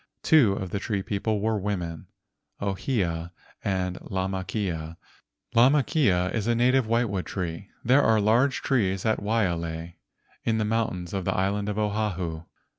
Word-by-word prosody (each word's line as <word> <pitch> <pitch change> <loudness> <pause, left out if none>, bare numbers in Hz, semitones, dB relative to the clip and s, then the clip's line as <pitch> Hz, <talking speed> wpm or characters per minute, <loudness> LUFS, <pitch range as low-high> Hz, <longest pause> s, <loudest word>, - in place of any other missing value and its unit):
Two 135 -11 +5
of 95 -2 -4
the 100 - -1
tree 100 -1 -2
people 105 +1 -1
were 110 0 +1
women, 90 -5 -3 0.5
Ohia 95 -5 -1 0.3
and 90 -2 -1
Lamakea. 95 -3 -3 0.6
Lamakea 125 - +3
is 110 -2 -1
a 120 - +3
native 125 +1 +3
whitewood 110 -5 0
tree. 90 +1 -4 0.2
There 130 +4 +5
are 110 -4 +4
large 120 +6 +2
trees 95 -8 +1
at 110 - +2
Waialae 85 -6 -1 0.5
in 110 -1 +1
the 110 - +1
mountains 105 -6 -1
of 95 -1 -2
the - - 0
island 100 +2 0
Oahu. 100 -6 -2
100 Hz, 135 wpm, -26 LUFS, 90-110 Hz, 0.6 s, Two